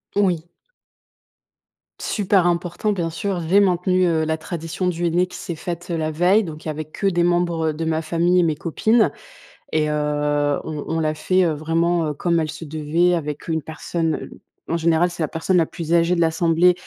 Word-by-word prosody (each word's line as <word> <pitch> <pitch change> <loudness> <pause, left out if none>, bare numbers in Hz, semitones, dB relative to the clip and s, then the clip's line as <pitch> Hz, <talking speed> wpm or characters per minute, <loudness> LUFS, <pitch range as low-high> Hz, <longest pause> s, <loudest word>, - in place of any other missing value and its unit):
Oui. 180 -5 +1 1.5
Super 195 -3 +2
important, 175 +4 0
bien 170 -4 -2
sûr, 185 +2 -3
j'ai 190 +5 +4
maintenu, 185 -1 +2
heu, 165 -2 +2
la 160 0 -1
tradition 165 +2 -4
du 175 -1 -1
henné 175 +2 +2
qui 180 - -12
s'est 170 - -5
faite, 175 +2 -6
heu, 170 - 0
la 155 0 -1
veille. 180 +7 +3
Donc 155 -2 -8
il - - -4
y - - 0
avait 155 +1 -5
que 155 +6 -3
des 175 -3 +2
membres 170 -2 +1
de 160 +2 -4
ma 160 0 0
famille 170 +3 +2
et - - +4
mes 160 -2 +1
copines 215 +9 +2 0.6
et 155 -1 +1
heu, 145 -1 0
on 150 -2 -5
on 165 - -1
l'a 155 -1 0
fait, 185 +4 +1
heu, 165 - +1
vraiment, 165 +2 0
heu, 150 - -2
comme 170 +3 +1
elle 155 -1 -1
se 165 - -7
devait, 160 +3 +1
avec 150 -4 -3
une 160 -1 0
personne, 160 +2 -2
heu, - - -8 0.4
en 165 - 0
général, 170 +1 +2
c'est 175 - -7
la 155 - +1
personne 165 +5 0
la 165 -2 +3
plus 165 -1 -4
âgée 170 +1 +3
de 170 - 0
l'assemblée 165 +2 +3
165 Hz, 205 wpm, -21 LUFS, 155-175 Hz, 1.5 s, j'ai